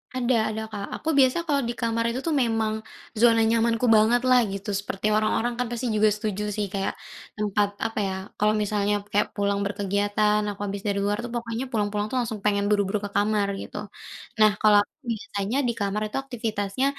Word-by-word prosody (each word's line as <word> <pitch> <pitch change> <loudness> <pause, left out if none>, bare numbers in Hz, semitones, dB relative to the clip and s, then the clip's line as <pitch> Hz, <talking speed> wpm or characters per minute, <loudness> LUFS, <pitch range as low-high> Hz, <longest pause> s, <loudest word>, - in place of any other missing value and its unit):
Ada 240 -3 +1
ada 220 0 -4
Kak, 200 -2 -4
aku 320 - -4
biasa 260 +3 +4
kalau 285 -2 +2
di 235 - -1
kamar 230 0 0
itu 245 - -3
tuh 315 - +1
memang, 225 -2 0 0.5
zona 230 0 +5
nyamanku 230 +1 +2
banget 225 +3 +4
lah 255 0 +7
gitu. 200 +1 -5
Seperti 200 0 -3
orang-orang 220 +2 +1
kan 250 - 0
pasti 240 +1 -2
juga 215 0 +4
setuju 210 -1 -3
sih 210 - -1
kayak, 195 -1 -1 0.4
tempat 210 -1 +1 0.2
apa 225 -1 -2
ya, 190 - -2 0.2
kalau 210 +1 +3
misalnya 205 0 0 0.2
kayak 205 - +2
pulang 200 -1 0
berkegiatan, 205 +1 +1
aku 200 - -11
habis 200 0 -4
dari 200 -1 0
luar 205 +1 0
tuh 240 - -6
pokoknya 230 +1 -3
pulang-pulang 210 -2 0
tuh 260 - -1
langsung 225 -3 -3
pengen 205 -1 +1
buru-buru 205 0 +1
ke - - -5
kamar, 205 0 +2
gitu. - - -8 0.6
Nah 215 0 +7
kalau 210 -1 +6
aku - - -24 0.2
biasanya 215 +1 -3
di - - +2
kamar 200 +1 -1
itu - - -2
aktivitasnya, 220 -2 -2
215 Hz, 190 wpm, -25 LUFS, 205-230 Hz, 0.6 s, lah